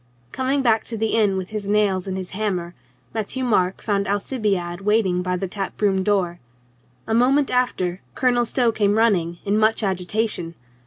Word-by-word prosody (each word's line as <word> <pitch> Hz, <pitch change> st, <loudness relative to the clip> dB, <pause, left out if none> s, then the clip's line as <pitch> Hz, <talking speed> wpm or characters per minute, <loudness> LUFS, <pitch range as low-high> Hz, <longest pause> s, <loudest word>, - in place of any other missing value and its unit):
Coming 265 Hz, +2 st, 0 dB
back 225 Hz, -3 st, +3 dB
to 230 Hz, -, -4 dB
the 220 Hz, 0 st, 0 dB
inn 205 Hz, -4 st, +3 dB
with 190 Hz, +1 st, -5 dB
his 210 Hz, -2 st, -4 dB
nails 200 Hz, -3 st, +1 dB
and 190 Hz, 0 st, -3 dB
his 185 Hz, -1 st, -6 dB
hammer, 185 Hz, -4 st, -2 dB, 0.4 s
Matthieu 225 Hz, +4 st, -2 dB
Marc 190 Hz, -6 st, +1 dB
found 200 Hz, -2 st, 0 dB
Alcibiade 200 Hz, -4 st, -1 dB
waiting 195 Hz, -3 st, +2 dB
by 180 Hz, 0 st, -1 dB
the 190 Hz, -, -3 dB
tap 195 Hz, +1 st, -5 dB
room 195 Hz, -2 st, +2 dB
door. 185 Hz, -3 st, 0 dB, 0.7 s
A -, -, -2 dB
moment 265 Hz, +4 st, +3 dB
after 190 Hz, -8 st, 0 dB
Colonel 245 Hz, -2 st, +2 dB
.Stow 240 Hz, -2 st, +2 dB
came 205 Hz, -1 st, +1 dB
running, 180 Hz, -7 st, +2 dB
in 205 Hz, +1 st, +2 dB
much 220 Hz, +1 st, +2 dB
agitation. 185 Hz, -2 st, -1 dB
205 Hz, 170 wpm, -22 LUFS, 185-225 Hz, 0.7 s, back